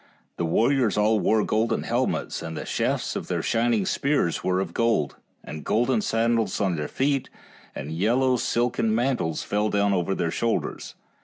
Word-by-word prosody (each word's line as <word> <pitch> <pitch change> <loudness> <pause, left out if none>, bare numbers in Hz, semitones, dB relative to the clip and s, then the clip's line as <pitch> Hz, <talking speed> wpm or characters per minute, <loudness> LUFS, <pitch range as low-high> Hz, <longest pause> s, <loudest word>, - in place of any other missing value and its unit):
6 - - -49
The 85 - -1
warriors 115 +5 +2
all 105 +1 +3
wore 110 0 +2
golden 110 +2 0
helmets, - - -1
and 80 -1 -6
the - - -5
shafts - - -1
of - - -4
their - - -2
shining 115 -3 +1
spears 140 - 0
were 95 0 +1
of 95 -3 -3
gold, 115 - +1 0.3
and 75 0 -8
golden 120 +1 +1
sandals 115 +1 0
on 95 -4 +1
their 75 -2 -3
feet, 135 0 0 0.5
and 70 +3 -6
yellow 120 +9 +2
silken 115 -2 0
mantles 120 -10 0
fell 105 +1 0
down 100 -1 +2
over 95 +1 0
their 85 - -1
shoulders. 115 +5 -2
110 Hz, 170 wpm, -25 LUFS, 95-120 Hz, 0.5 s, all